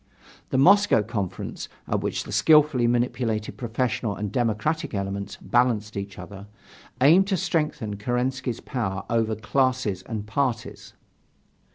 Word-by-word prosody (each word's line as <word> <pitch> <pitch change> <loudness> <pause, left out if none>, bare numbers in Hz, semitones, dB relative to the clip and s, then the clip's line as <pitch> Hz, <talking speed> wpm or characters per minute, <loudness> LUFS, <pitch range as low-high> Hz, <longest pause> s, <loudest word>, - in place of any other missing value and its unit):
The - - 0
Moscow 200 - +5
Conference, 105 -5 -5 0.2
at - - 0
which - - -2
the - - -9
skilfully 150 -6 +4
manipulated 120 -2 -1
professional 120 -3 -2
and 105 -1 -4
democratic 120 +4 -1
elements 100 0 -4
balanced 115 -4 +1
each 100 0 -5
other, 100 0 -9 0.5
aimed 165 +9 +6
to 195 -2 +1
strengthen 155 - -1
Kerensky's 125 +2 -2
power 105 -8 -3
over 115 -1 +1
classes 125 -3 0
and 105 +1 -5
parties. 120 +1 -3
120 Hz, 125 wpm, -25 LUFS, 105-130 Hz, 0.5 s, aimed